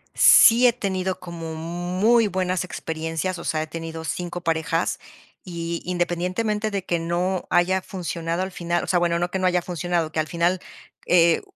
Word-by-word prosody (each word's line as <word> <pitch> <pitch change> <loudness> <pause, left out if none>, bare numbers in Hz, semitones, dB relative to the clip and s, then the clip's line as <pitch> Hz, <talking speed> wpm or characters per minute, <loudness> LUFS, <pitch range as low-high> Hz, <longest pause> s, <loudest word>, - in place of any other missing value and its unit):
sí 240 +2 +7
he 240 - +6
tenido 190 -4 -2
como 165 -2 -7
muy 180 +8 +1
buenas 185 -1 -1
experiencias, 165 +1 -4
o 170 - -8
sea, 155 -1 -1
he 155 - -4
tenido 165 0 -6
5 175 +3 -4
parejas. 165 0 -1 0.4
Y, 170 -1 -5
independientemente 180 +5 -1
de 195 -2 -2
que 170 - 0
no 175 +3 -1
haya 185 +2 +2
funcionado 170 -1 -3
al 190 0 -3
final 175 -1 -2
o - - -6
sea, 175 +1 +2
bueno, 170 -1 +1
no 175 +1 -1
que 190 - -2
no 185 - -1
haya 180 -1 +2
funcionado, 175 -2 -2
que 160 - -2
al 155 - 0
final, 170 +2 0 0.5
eh 170 -2 +4
175 Hz, 175 wpm, -23 LUFS, 165-185 Hz, 0.5 s, sí